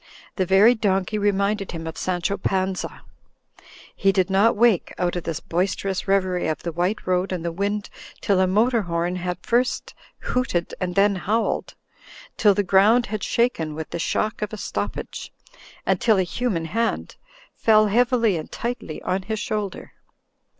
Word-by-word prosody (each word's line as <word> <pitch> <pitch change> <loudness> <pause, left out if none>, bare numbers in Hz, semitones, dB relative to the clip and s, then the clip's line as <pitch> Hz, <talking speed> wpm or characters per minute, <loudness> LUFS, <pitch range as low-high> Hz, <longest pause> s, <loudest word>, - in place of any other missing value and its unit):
The 185 -2 0
very 200 +6 +6
donkey 205 -2 0
reminded 200 0 0
him 165 -1 -6
of 160 - -5
Sancho 185 +2 -1
Panza. 190 -1 -2 0.9
He 195 - +3
did 190 -1 +1
not 205 +4 +4
wake 225 -5 +3
out 180 0 0
of 175 - -4
this 165 -1 -3
boisterous 190 +3 -2
reverie 185 -3 +1
of 155 - -3
the 170 - -2
white 180 +6 -1
road 185 +1 0
and 175 -2 -3
the 170 - -1
wind 200 +4 -2 0.3
till 195 -2 +1
a 185 - +3
motor 225 +5 +2
horn 175 0 -2
had 180 -1 -3
first 245 +1 0 0.3
hooted 235 -9 -1
and 180 -1 -2
then 200 +1 +4
howled, 215 +5 -1 0.6
till 205 -2 +4
the 205 - +1
ground 205 +6 +4
had 215 - -2
shaken 165 -11 0
with 160 0 -6
the 170 - -3
shock 215 +7 -1
of 210 - -2
a 215 - -6
stoppage, - - -5 0.5
and - - +1
till 225 -3 +4
a 190 - +3
human 180 -2 -2
hand 230 +7 -2 0.4
fell 215 -1 +4
heavily 230 -2 +2
and 155 - -7
tightly 235 -9 -5
on 190 +1 -1
his 220 +3 -4
shoulder. 210 -2 -4
195 Hz, 165 wpm, -23 LUFS, 180-215 Hz, 0.9 s, very